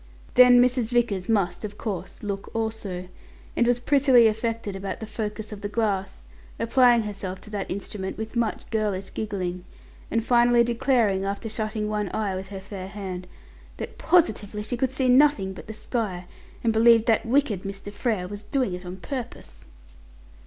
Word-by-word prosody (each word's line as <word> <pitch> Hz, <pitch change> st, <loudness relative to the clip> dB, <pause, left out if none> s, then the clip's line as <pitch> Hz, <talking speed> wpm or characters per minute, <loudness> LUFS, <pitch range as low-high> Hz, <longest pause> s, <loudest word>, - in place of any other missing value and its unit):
Then 250 Hz, -1 st, +8 dB
Mrs. 245 Hz, -2 st, +3 dB
Vickers 230 Hz, -5 st, +1 dB
must, 190 Hz, -5 st, +1 dB
of 205 Hz, -1 st, -6 dB
course, 190 Hz, -4 st, -5 dB
look 200 Hz, -1 st, -4 dB
also, 220 Hz, -5 st, -3 dB, 0.5 s
and 235 Hz, -, +3 dB
was 245 Hz, 0 st, +3 dB
prettily 265 Hz, -2 st, +5 dB
affected 220 Hz, -1 st, -1 dB
about 195 Hz, 0 st, -5 dB
the 220 Hz, -, -5 dB
focus 215 Hz, 0 st, -5 dB
of 205 Hz, -1 st, -8 dB
the 205 Hz, -, -3 dB
glass, 200 Hz, -, -2 dB, 0.3 s
applying 235 Hz, 0 st, +4 dB
herself 195 Hz, -3 st, -5 dB
to 210 Hz, -, -12 dB
that 205 Hz, -2 st, -4 dB
instrument 190 Hz, 0 st, -4 dB
with 220 Hz, +2 st, -6 dB
much 235 Hz, -2 st, -1 dB
girlish 205 Hz, -4 st, -1 dB
giggling, 185 Hz, -4 st, -3 dB, 0.5 s
and 230 Hz, -1 st, 0 dB
finally 240 Hz, 0 st, +5 dB
declaring, 235 Hz, -5 st, +2 dB
after 200 Hz, +3 st, -3 dB
shutting 215 Hz, 0 st, -2 dB
one 210 Hz, -2 st, -1 dB
eye 210 Hz, -3 st, -1 dB
with 190 Hz, +1 st, -5 dB
her 195 Hz, -1 st, -7 dB
fair 190 Hz, -1 st, -7 dB
hand, 190 Hz, -3 st, -6 dB, 0.5 s
that -, -, -7 dB
positively 210 Hz, -, +2 dB
she 230 Hz, +4 st, -2 dB
"could 260 Hz, +2 st, 0 dB
see 260 Hz, 0 st, 0 dB
nothing 250 Hz, -7 st, +4 dB
but 200 Hz, +3 st, -9 dB
sky, 210 Hz, -6 st, -3 dB, 0.4 s
and 230 Hz, -1 st, +2 dB
believed 225 Hz, 0 st, +6 dB
that 225 Hz, -2 st, +3 dB
wicked 240 Hz, -5 st, +1 dB
Mr. 200 Hz, +1 st, -6 dB
Frere 205 Hz, -4 st, -1 dB
was 205 Hz, +1 st, -7 dB
doing 245 Hz, -1 st, -1 dB
it 180 Hz, 0 st, -7 dB
on 180 Hz, +1 st, -6 dB
purpose." 245 Hz, +6 st, -7 dB
215 Hz, 165 wpm, -25 LUFS, 195-235 Hz, 0.5 s, Then